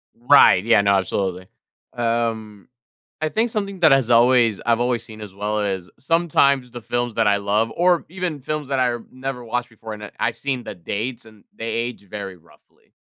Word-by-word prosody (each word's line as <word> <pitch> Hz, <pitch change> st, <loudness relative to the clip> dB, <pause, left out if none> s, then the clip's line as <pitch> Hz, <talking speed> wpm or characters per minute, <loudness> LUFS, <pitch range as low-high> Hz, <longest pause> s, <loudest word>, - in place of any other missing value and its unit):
Right, 120 Hz, -6 st, +6 dB
yeah, 115 Hz, -2 st, +4 dB
no, 100 Hz, 0 st, +3 dB
absolutely. 95 Hz, -1 st, -2 dB, 0.5 s
Um, 115 Hz, -3 st, -2 dB, 0.5 s
I 155 Hz, -, 0 dB
think 225 Hz, +7 st, +1 dB
something 200 Hz, -3 st, -4 dB
that 160 Hz, -, +6 dB
has 135 Hz, -3 st, +3 dB
always 120 Hz, -2 st, +4 dB
I've 115 Hz, -1 st, +2 dB
always 120 Hz, -1 st, 0 dB
seen 110 Hz, -1 st, -12 dB
as 105 Hz, -3 st, -9 dB
well 105 Hz, +2 st, -2 dB
is, 95 Hz, -3 st, -3 dB
sometimes 140 Hz, -4 st, +2 dB
the 120 Hz, -, -8 dB
films 120 Hz, 0 st, -2 dB
that 115 Hz, -2 st, +2 dB
I 100 Hz, -1 st, +4 dB
love 105 Hz, +3 st, 0 dB
or 175 Hz, -1 st, +2 dB
even 175 Hz, -5 st, -4 dB
films 150 Hz, +1 st, -4 dB
that 135 Hz, -1 st, -1 dB
I've 120 Hz, -2 st, -1 dB
never 130 Hz, -1 st, -5 dB
watched 120 Hz, +1 st, -3 dB
before, 110 Hz, -1 st, -9 dB
and 105 Hz, 0 st, -9 dB
I -, -, -11 dB
I've 115 Hz, -, -1 dB
seen 135 Hz, -3 st, -3 dB
the -, -, -7 dB
dates 110 Hz, +7 st, -5 dB
and 110 Hz, -2 st, -18 dB
they 115 Hz, -, -6 dB
age 115 Hz, -3 st, -4 dB
very 100 Hz, -2 st, -7 dB
roughly. 85 Hz, -, -27 dB
115 Hz, 195 wpm, -21 LUFS, 105-130 Hz, 0.5 s, Right